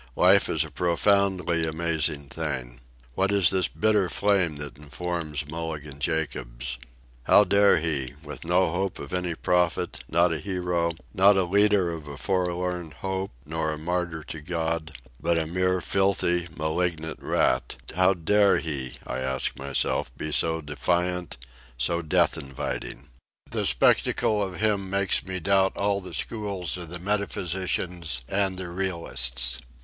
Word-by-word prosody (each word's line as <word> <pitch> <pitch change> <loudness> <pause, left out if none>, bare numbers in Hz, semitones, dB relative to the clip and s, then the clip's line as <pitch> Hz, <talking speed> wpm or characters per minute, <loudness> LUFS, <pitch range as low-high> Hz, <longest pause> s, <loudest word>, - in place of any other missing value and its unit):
Life - - +5
is - - +2
a - - -9
profoundly 90 -1 +2
amazing 80 -3 -1
thing. 65 -6 -4 0.3
What 95 +8 +1
is 100 -5 +5
this 95 -1 +2
bitter 105 -4 +1
flame 95 -6 +2
that 75 -1 -4
informs 75 -1 -4
Mulligan 75 -3 -6
Jacobs? 65 -6 -2 0.5
How 105 - +7
dare 100 +1 +4
he—with 75 -1 -4
no 90 +1 +2
hope 95 +2 -1
of 70 - -8
any 90 -2 -1
profit, 90 0 0
not 85 +1 +3
a 80 - -3
hero, 90 -3 -1 0.2
not 100 +1 +5
a 95 - +4
leader 100 -1 +3
of 80 -3 -7
a 70 -1 -8
forlorn 90 -2 -1
hope 95 +3 -4 0.2
nor 80 +1 -2
a 75 - -4
martyr 85 0 -2
to 80 +1 -8
God, 80 0 -2 0.3
but 85 0 +2
a 80 - +1
mere 90 +2 +1
filthy, 90 -2 +2
malignant 80 0 -2
rat—how 90 +8 +1
dare 100 +4 +4
he, 70 -6 -2
I - - -4
ask 65 0 0
myself, 70 -2 -1
be 75 - -4
so 80 +2 +1
defiant, 85 +5 -1 0.4
so 85 +8 0
death 85 0 +2
inviting? 70 -1 -5 0.4
The - - +1
spectacle 105 - +3
of 95 -2 -3
him 105 -3 0
makes 100 0 +2
me 95 -1 -3
doubt 95 +1 +2
all 100 0 +1
the 95 - -7
schools 100 -6 -2
of 90 -2 -7
the 90 - -6
metaphysicians 90 -5 -2
and 95 -1 0
the 95 -1 -4
realists. 65 -9 0
85 Hz, 145 wpm, -26 LUFS, 75-95 Hz, 0.5 s, How